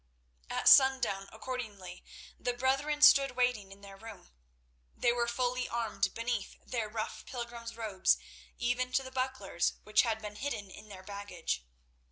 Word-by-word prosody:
At - - -1
sundown, 260 -8 +6
accordingly, 215 -7 -7 0.4
the 245 - -1
brethren 275 +4 +1
stood 275 -3 +7
waiting 245 -6 0
in 195 +1 -13
their 195 -1 -11
room. 220 - -12 0.7
They 240 - +3
were 240 -1 0
fully 250 +1 -1
armed 215 -5 -1
beneath 230 -2 -3
their 230 -4 -2
rough 215 0 -4
pilgrims' 235 -2 -6
robes, 210 -5 +2 0.4
even 250 +1 0
to 270 - +2
the 260 - -9
bucklers 255 -9 -1
which 215 0 +4
had 225 -2 -1
been 210 -1 -8
hidden 210 -8 -4
in 215 - -12
their 190 -2 -10
baggage. 200 - -4
230 Hz, 150 wpm, -32 LUFS, 200-250 Hz, 0.7 s, stood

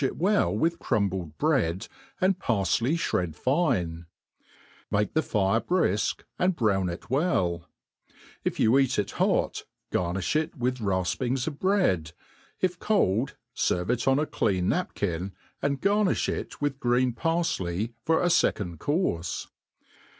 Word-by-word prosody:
it 135 - -1
well 200 +5 +2
with 170 +1 0
crumbled 95 -6 -1
bread 120 - +1 0.3
and 185 0 +2
parfley, 115 - +1
(bred 85 -4 0
fine; 95 - 0 0.8
make 105 0 0
the 160 - +3
fire 105 -4 +1
briflc, 105 - 0 0.2
and 180 0 +2
brown 100 - +1
it 85 - -7
welL 90 - 0 0.7
If - - -2
you 110 - +4
e^t 135 -1 +3
it 105 - 0
hot, - - 0 0.3
gar 90 0 0
niih 95 +9 -1
it 160 +2 -2
with 125 -1 -1
rafpings 110 +6 0
of 150 -3 -5
bread; 175 - +1 0.5
if 180 -2 0
cold, 135 - +1 0.2
ferve 90 +5 +1
it 125 +1 -1
on 135 0 +4
a 150 - +1
.c/ean 95 -10 0
napkin, 95 - -2 0.3
and 140 -1 0
garriiih 205 +2 +2
it - - -4
with 145 -2 -1
green 125 0 +2
parfley 115 - -1
for 160 +2 +2
a 175 - +3
fecond 90 - +1
courfe. 120 - -1
120 Hz, 140 wpm, -27 LUFS, -, 0.8 s, you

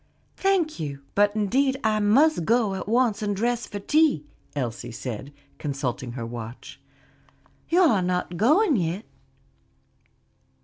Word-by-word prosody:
"Thank 370 - +1
you; 140 -3 -5
but 205 +1 +3
indeed 265 +6 +1
I 215 -1 +2
must 230 - +4
go 225 +1 +2
at 190 - -5
once 235 -2 +2
and 205 -1 -1
dress 240 +3 -1
for 205 - -6
tea," 300 +8 +2 0.3
Elsie 120 -5 -3
said, 125 +3 -6 0.3
consulting 130 -4 -3
her 120 -2 -5
watch. 115 0 -8 0.9
"You 350 +3 +4
are 255 - +4
not 180 -1 -1
going 300 - +4
yet?" 180 +4 -2
205 Hz, 130 wpm, -25 LUFS, -, 0.9 s, must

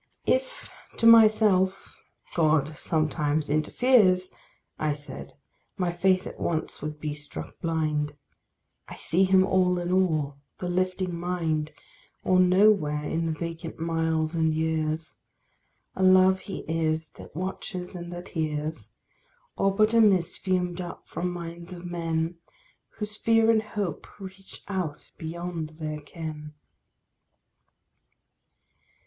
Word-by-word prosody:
If - - 0 0.3
to 230 - 0
myself 215 -4 +5 0.4
"God 155 -2 +2
sometimes 155 -1 0
interferes" 185 - +3 0.5
I 155 -1 0
said, 145 0 -9 0.4
my 180 -2 0
faith 185 +2 +2
at - - -8
once 160 -2 -2
would 150 0 -5
be 150 -1 -3
struck 145 - -9
blind. 155 -3 -1 0.7
I - - -8
see 185 +3 +2
him 190 0 +5
all 185 -1 +2
in 175 0 -2
all, 155 -7 +1 0.2
the 180 - -4
lifing 185 0 0
mind, 170 -3 -1 0.5
Or 185 0 +3
nowhere 185 -5 +4
in 165 +2 -1
the - - 0
vacant 165 +1 -5
miles 160 -1 0
and 160 -1 +1
years. 155 -4 -1 0.8
A - - -3
love 185 0 +6
he 195 - -7
is 160 -1 0
that - - -13
watches 185 +1 -5
and 175 -1 -7
that 175 +1 -8
hears, 155 - -3 0.7
Or 195 - +2
but 215 +2 +3
a 230 - +6
mist 190 -6 +3
fumed 180 -1 -1
up 175 -1 -8
from 180 +1 -3
minds 170 0 -7
of 175 0 -9
men, 165 -1 -2 0.5
Whose 210 0 -4
fear 225 0 +4
and 220 -1 +3
hope 205 -6 -4
reach 195 0 -11
out 185 -7 -4
beyond 165 -1 -5
their 155 -1 -4
ken. 150 -1 -8
170 Hz, 125 wpm, -27 LUFS, 155-185 Hz, 0.8 s, love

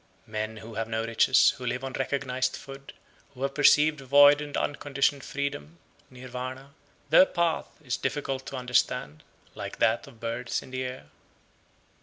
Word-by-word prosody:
92. - - -22
Men 110 0 -3
who 115 - -9
have 115 - -2
no 110 0 -2
riches, 115 +3 +4
who 125 - -6
live 125 +2 -2
on 135 -1 -5
recognised 130 -1 -1
food, 135 0 -11 0.4
who 130 - -6
have 135 0 -1
perceived 150 +1 +4
void 145 +2 +6
and 145 -1 -5
unconditioned 140 -1 0
freedom 85 - -4 0.3
(Nirvana), 130 +2 -8 0.4
their 185 - +8
path 170 -1 0 0.2
is - - -2
difficult 135 -2 -3
to - - -6
understand, 125 - 0 0.3
like - - -7
that 115 +5 +1
of 125 -5 -16
birds 115 +1 -3
in - - -14
the 130 0 -3
air. 125 - -6
130 Hz, 160 wpm, -27 LUFS, 120-140 Hz, 0.4 s, their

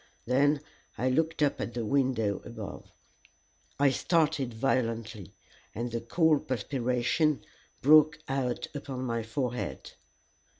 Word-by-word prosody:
Then 140 +4 +3 0.4
I 130 +3 +1
looked 160 +3 +1
up 145 - +1
at 120 - -4
the 120 -2 -2
window 120 -6 +1
above. 110 -3 -8 0.9
I 140 -1 +5
started 155 -3 +1
violently, 115 - -2 0.4
and 120 +2 -3
the 115 0 -2
cold 155 +4 +2
perspiration 130 +4 0 0.4
broke 155 +1 +6
out 130 -3 -1
upon 135 -3 -5
my 115 -2 -1
forehead. 125 +2 -4
130 Hz, 115 wpm, -29 LUFS, 115-145 Hz, 0.9 s, broke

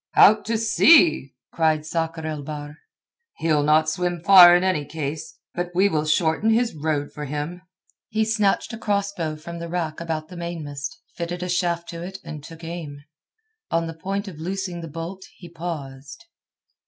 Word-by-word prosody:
"Out 215 +1 +6
to 225 +1 0
sea!" 185 - +5 0.2
cried 155 -2 +1
Sakr 165 0 -3
el 155 -2 -3
Bahr. 145 0 -7 0.6
"He'll 155 -2 +2
not 155 +2 +3
swim 175 +2 -1
far 175 0 +9
in 180 - +2
any 185 -6 +1
case. 155 +1 -5 0.2
But 175 0 -3
we 195 +3 +4
will 155 -4 0
shorten 160 +6 +2
his 230 +1 +2
road 150 -2 -2
for 150 - -6
him." 150 +5 -4 0.5
He 220 0 +1
snatched 215 0 +1
a 225 - -6
cross 200 -2 0
bow 160 -4 -3
from 170 +2 -8
the 170 0 -6
rack 165 -2 -3
about 160 -2 -4
the 180 - -10
mainmast, 150 -5 -5
fitted 175 +1 -4
a 180 - -4
shaft 175 -1 0
to 170 0 -6
it 190 +2 -6
and 150 -2 -8
took 165 +1 -12
aim. 160 -4 -7 0.7
On 165 0 +1
the 165 - -5
point 195 +5 -4
of 170 -6 -9
loosing 180 0 -4
the 165 - -7
bolt 165 +5 -7
he 175 - -11
paused. 145 - -7
165 Hz, 180 wpm, -23 LUFS, 155-180 Hz, 0.7 s, far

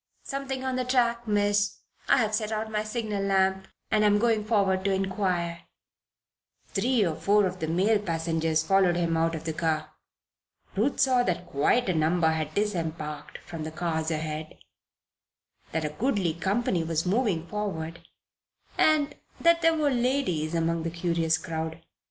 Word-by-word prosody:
"Something 270 -1 -4
on 260 -1 -1
the 255 - 0
track, 240 -2 +1
Miss. 205 -1 +1 0.3
I - - +6
have 220 -4 +1
set 215 0 -1
out 220 0 -3
my 210 0 0
signal 215 -2 -3
lamp 190 -1 +1 0.2
and 215 0 +3
am 205 0 +4
going 225 -1 +2
forward 200 -4 +1
to 200 - +2
inquire." 185 -3 -1 1.0
Three 245 -5 +2
or 165 - 0
four 205 +3 +3
of 185 0 -3
the 160 - -2
male 195 +6 +2
passengers 165 -3 0
followed 190 0 +3
him 170 -1 0
out 165 0 +1
of 160 - -6
the 160 -1 -3
car. 155 -1 -1 0.8
Ruth 230 +8 0
saw 260 -2 +4
that 180 -5 -1
quite 190 - +1
a 185 - +2
number 160 +1 +2
had 155 -1 -3
disembarked 160 -7 -3
from 165 -2 -6
the 155 - -4
cars 160 0 -2
ahead, 155 -1 -4 1.1
that 160 -1 -1
a - - -1
goodly 195 - 0
company 190 0 0
was 165 0 -1
moving 190 -4 +1
forward, 170 -5 -4 0.8
and 300 -2 +3 0.3
that 335 0 +4
there 330 0 +4
were 295 -2 +2
ladies 240 - 0
among 165 0 0
the 165 - -2
curious 165 -1 0
crowd. 160 -1 -4
190 Hz, 160 wpm, -27 LUFS, 165-215 Hz, 1.1 s, I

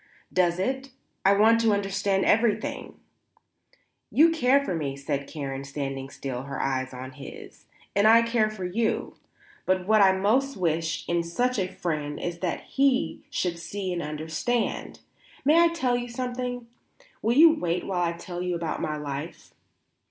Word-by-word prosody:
"Does 175 -2 +2
it? 265 +8 -2 0.3
I 195 - +6
want 225 +3 +5
to 225 -2 +3
understand 195 -1 0
everything." 220 -1 +1 1.1
"You 325 +3 +5
care 280 -2 +3
for 185 - -2
me," 140 -4 -3
said 140 0 -3
Karen, 135 -3 -5
standing 135 -1 -5
still, 130 -3 -5
her 135 0 -6
eyes 130 -1 -1
on 130 0 -7
his, 135 +1 -11 0.3
"and 200 +2 +5
I 230 +1 +7
care 230 -2 +2
for 205 -4 -6
you; 220 +5 -1 0.5
but 185 -1 +1
what 215 +1 +4
I 190 -1 +6
most 245 +9 +1
wish 165 -2 -1
in 170 0 +1
such 245 +9 -1
a 185 -1 -1
friend 150 -4 -3
is 170 -1 -4
that 175 -5 -2
he 275 +1 +1
should 180 -11 -2
see 190 +2 -4
and 175 - -2
understand. 160 +10 -2 0.4
May 315 +4 +6
I 340 - +6
tell 265 -8 0
you 245 0 -3
something? 245 0 -4 0.6
Will 235 +3 +1
you 320 +1 +8
wait 175 - -2
while 185 -2 -1
I 170 -1 +1
tell 175 +1 -7
you 180 -1 -1
about 165 -2 -3
my 155 -1 -2
life?" 145 +2 -6
185 Hz, 165 wpm, -26 LUFS, 155-235 Hz, 1.1 s, you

